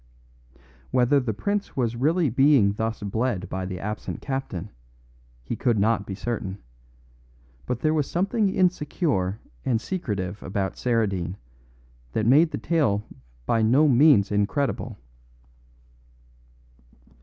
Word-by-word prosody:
Whether 130 Hz, +3 st, +3 dB
the 125 Hz, -4 st, -2 dB
prince 205 Hz, -, -3 dB
was 120 Hz, -3 st, 0 dB
really 155 Hz, +4 st, +2 dB
being 135 Hz, -5 st, +4 dB
thus 110 Hz, 0 st, -3 dB
bled 105 Hz, -1 st, -1 dB
by 95 Hz, 0 st, -3 dB
the 90 Hz, -1 st, -5 dB
absent 105 Hz, +2 st, -5 dB
captain, 110 Hz, -, -4 dB, 0.7 s
he -, -, -4 dB
could 120 Hz, -3 st, +1 dB
not 105 Hz, 0 st, +1 dB
be 95 Hz, -, -4 dB
certain, 100 Hz, -2 st, -4 dB, 1.1 s
but 125 Hz, -1 st, -2 dB
there 155 Hz, 0 st, +2 dB
was 150 Hz, -3 st, 0 dB
something 200 Hz, +4 st, +1 dB
insecure 150 Hz, -, 0 dB, 0.2 s
and 115 Hz, -3 st, +1 dB
secretive 105 Hz, -, -4 dB
about 95 Hz, 0 st, -2 dB
Saradine 100 Hz, -7 st, -1 dB, 0.8 s
that 110 Hz, -, 0 dB
made 150 Hz, +8 st, +5 dB
the -, -, -4 dB
tale 135 Hz, -12 st, +1 dB, 0.4 s
by 115 Hz, -, +2 dB
no 130 Hz, +8 st, +4 dB
means 130 Hz, -6 st, +5 dB
incredible. 105 Hz, +8 st, -1 dB
115 Hz, 120 wpm, -25 LUFS, 100-145 Hz, 1.1 s, made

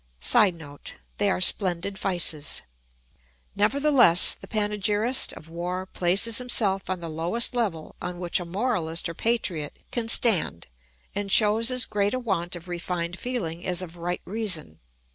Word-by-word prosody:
[Sidenote: 160 Hz, -, 0 dB, 0.2 s
They 205 Hz, 0 st, +2 dB
are 190 Hz, -, 0 dB
splendid 185 Hz, +1 st, +1 dB
vices.] 175 Hz, -6 st, -1 dB, 0.9 s
Nevertheless 245 Hz, -, +5 dB
the -, -, -13 dB
panegyrist 210 Hz, +3 st, 0 dB
of 155 Hz, -, -13 dB
war 175 Hz, +3 st, -4 dB
places 190 Hz, +6 st, +2 dB
himself 205 Hz, -7 st, 0 dB
on 185 Hz, -2 st, -3 dB
the 170 Hz, -, -5 dB
lowest 170 Hz, +11 st, 0 dB
level 200 Hz, -10 st, -3 dB
on 180 Hz, 0 st, -5 dB
which 175 Hz, 0 st, -1 dB
a 175 Hz, -, -6 dB
moralist 175 Hz, -4 st, -1 dB
or 170 Hz, -, -6 dB
patriot 175 Hz, -8 st, -2 dB
can 235 Hz, -2 st, -2 dB
stand 200 Hz, -, +3 dB, 0.5 s
and 200 Hz, -1 st, -4 dB
shows 220 Hz, +3 st, +5 dB
as 255 Hz, -2 st, +3 dB
great 205 Hz, +2 st, -1 dB
a -, -, -2 dB
want 185 Hz, -7 st, -2 dB
of 175 Hz, +1 st, -10 dB
refined 175 Hz, 0 st, -4 dB
feeling 175 Hz, -10 st, -4 dB
as 180 Hz, 0 st, -1 dB
of 170 Hz, -1 st, -10 dB
right 175 Hz, +1 st, -4 dB
reason. 185 Hz, -, -3 dB
185 Hz, 145 wpm, -25 LUFS, 170-220 Hz, 0.9 s, Nevertheless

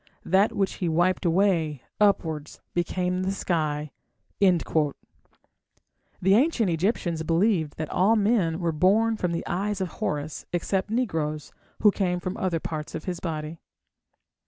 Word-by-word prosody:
That 195 Hz, +4 st, +3 dB
which 195 Hz, -1 st, 0 dB
he 175 Hz, -, +1 dB
wiped 175 Hz, +4 st, +1 dB
away, 165 Hz, -6 st, +2 dB, 0.2 s
upwards, 160 Hz, -8 st, +1 dB
became 180 Hz, +1 st, -1 dB
the 185 Hz, +1 st, 0 dB
sky." 155 Hz, -6 st, -1 dB, 0.5 s
The 180 Hz, -5 st, +2 dB, 1.5 s
ancient 225 Hz, -, +3 dB
Egyptians 170 Hz, -1 st, 0 dB
believed 165 Hz, -1 st, +1 dB
that 155 Hz, -1 st, -4 dB
all 200 Hz, +5 st, +3 dB
men 200 Hz, -6 st, +2 dB
were 170 Hz, -2 st, 0 dB
born 205 Hz, +8 st, +3 dB
from 180 Hz, -5 st, -1 dB
the 170 Hz, -, -3 dB
eyes 200 Hz, +3 st, -2 dB
of 190 Hz, -2 st, -2 dB
Horus 150 Hz, 0 st, -4 dB
except 190 Hz, +3 st, -1 dB
negroes, 160 Hz, -, -2 dB, 0.3 s
who 210 Hz, -, +7 dB
came 180 Hz, -3 st, -1 dB
from 180 Hz, +1 st, -4 dB
other 180 Hz, -3 st, 0 dB
parts 155 Hz, -1 st, -5 dB
of -, -, -5 dB
his 180 Hz, -2 st, -3 dB
body. 155 Hz, -1 st, -5 dB
180 Hz, 135 wpm, -26 LUFS, 160-195 Hz, 1.5 s, who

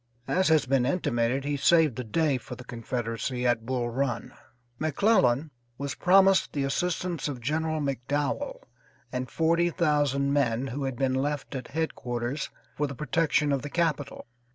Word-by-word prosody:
As 185 Hz, +1 st, +2 dB
has 155 Hz, -3 st, +4 dB
been 130 Hz, 0 st, +2 dB
intimated, 130 Hz, -3 st, 0 dB
he 145 Hz, 0 st, 0 dB
saved 155 Hz, -1 st, +4 dB
the 125 Hz, -, -4 dB
day 140 Hz, +3 st, +1 dB
for 125 Hz, +2 st, -8 dB
the 125 Hz, -, -10 dB
Confederacy 120 Hz, +1 st, -3 dB
at 115 Hz, -2 st, +1 dB
Bull 125 Hz, -2 st, -1 dB
Run. 125 Hz, -1 st, -2 dB, 0.5 s
McClellan 155 Hz, -, +2 dB, 0.3 s
was 140 Hz, 0 st, -3 dB
promised 190 Hz, +1 st, +4 dB
the 140 Hz, -, 0 dB
assistance 175 Hz, +4 st, -1 dB
of 140 Hz, -4 st, -4 dB
General 155 Hz, +5 st, -1 dB
McDowell 140 Hz, +1 st, -2 dB, 0.5 s
and 125 Hz, 0 st, -3 dB
forty 170 Hz, +1 st, +2 dB
thousand 145 Hz, -5 st, +1 dB
men 130 Hz, -3 st, +1 dB
who 135 Hz, +2 st, -3 dB
had 135 Hz, -2 st, -2 dB
been 130 Hz, +1 st, 0 dB
left 145 Hz, +2 st, -2 dB
at 130 Hz, -3 st, -5 dB
headquarters 130 Hz, -3 st, -3 dB, 0.3 s
for 150 Hz, -, 0 dB
the 140 Hz, -, -7 dB
protection 150 Hz, +2 st, +1 dB
of 140 Hz, -2 st, +1 dB
the 145 Hz, -, -6 dB
capital. 155 Hz, -4 st, -1 dB
140 Hz, 155 wpm, -27 LUFS, 125-155 Hz, 0.5 s, has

